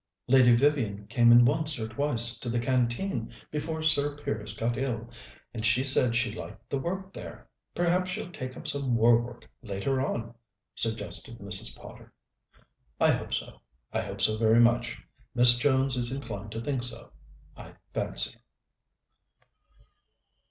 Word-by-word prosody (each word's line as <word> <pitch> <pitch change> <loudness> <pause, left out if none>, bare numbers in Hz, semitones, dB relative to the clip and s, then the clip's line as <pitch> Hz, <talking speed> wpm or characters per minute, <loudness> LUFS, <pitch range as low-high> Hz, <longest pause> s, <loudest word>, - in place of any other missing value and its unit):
"Lady 125 -2 +5
Vivian 120 -7 0
came 120 +2 +3
in 120 0 +7
once 155 +2 +3
or 110 - -3
twice 120 -1 +4
to 120 - -5
the 120 - -1
Canteen, 125 +9 -1 0.2
before 160 +1 -4
Sir 145 -2 +1
Piers 110 -6 -5
got 120 +1 -1
ill, 120 -3 -3 0.5
and 110 -2 -6
she 115 +4 +2
said 130 -3 +2
she 115 -1 0
liked 110 +2 -10
the 140 - -1
work 190 +5 -5
there. - - -10 0.3
Perhaps 175 +2 +1
she'll 180 0 -5
take 130 -6 -7
up - - -7
some 135 -4 -1
war 115 +1 +4
work 120 0 -10
later 120 +5 -2
on," 115 -3 -4 0.4
suggested 115 +1 -3
Mrs. 95 - -6
Potter. - - -14 0.9
"I - - +4
hope - - -3
so - - -7 0.3
I - - 0
hope - - -6
so 110 0 +6
very 110 +1 +4
much. 120 0 +2 0.4
Miss 120 0 +8
Jones 135 -1 +2
is 120 -1 +3
inclined 110 -6 -6
to 115 - -5
think 135 -2 -2
so, 120 -1 0 0.4
I - - -12 0.2
fancy." - - -1
120 Hz, 150 wpm, -27 LUFS, 115-140 Hz, 0.9 s, Miss